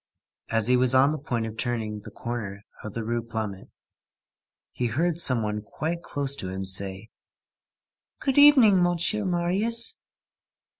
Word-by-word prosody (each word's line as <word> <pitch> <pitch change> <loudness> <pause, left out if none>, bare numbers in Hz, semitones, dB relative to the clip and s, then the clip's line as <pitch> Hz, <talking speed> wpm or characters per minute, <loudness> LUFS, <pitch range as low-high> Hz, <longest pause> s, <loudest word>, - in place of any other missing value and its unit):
As 115 -2 +1
he 125 +2 +4
was 125 0 +3
on 135 +3 +5
the 155 - -4
point 120 -5 -3
of 110 -1 -7
turning 110 -2 -3
the - - -11
corner 105 -4 -6 0.2
of 110 - -8
the 115 - -3
Rue 120 +1 -2
Plumet, 110 -4 -6 1.0
he 125 - -2
heard 165 +8 -1
some 125 -7 +2
one 105 0 -3
quite 160 +11 -5
close 140 -4 -2
to 95 - -5
him 95 +1 -5
say:— 95 +3 0 1.1
"Good 275 -1 +1
evening, 255 -10 +7
Monsieur 175 +4 +1
Marius." 195 - +1
120 Hz, 150 wpm, -25 LUFS, 110-175 Hz, 1.1 s, evening